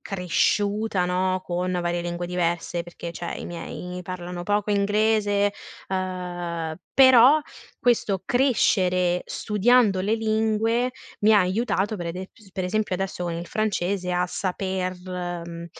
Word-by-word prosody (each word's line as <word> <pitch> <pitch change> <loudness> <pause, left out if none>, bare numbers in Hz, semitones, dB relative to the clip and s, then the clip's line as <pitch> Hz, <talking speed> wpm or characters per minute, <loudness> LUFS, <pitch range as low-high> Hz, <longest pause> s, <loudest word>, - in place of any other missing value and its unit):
cresciuta, 200 +2 0
no, 185 +1 0
con 180 +1 -2
varie 175 -1 -1
lingue 175 0 -3
diverse, 175 -1 -1
perché, 170 0 -7
cioè, 170 +1 -5
i - - -6
miei 180 +1 -6
parlano 175 -1 -6
poco 205 +2 0
inglese, 205 0 +2 0.4
uhm, 175 -3 -3 0.2
però 260 +3 +7 0.4
questo 210 -6 +1
crescere, 185 -8 +2
studiando 210 -1 +3
le 205 +4 +1
lingue, 225 +2 +1 0.3
mi 215 +1 +6
ha 205 - +6
aiutato 205 +2 0
per 175 -2 -5
ede 185 +3 -5
ps 200 -4 -20
per 185 - -3
esempio, 205 +1 -1
adesso 185 -1 -3
con 170 - -2
il 170 +1 -4
francese, 195 -3 -1
a 180 0 +2
saper, 185 0 -2
mhmm, 185 - -8 0.3
ehm, 170 0 -8
185 Hz, 135 wpm, -24 LUFS, 175-210 Hz, 0.4 s, però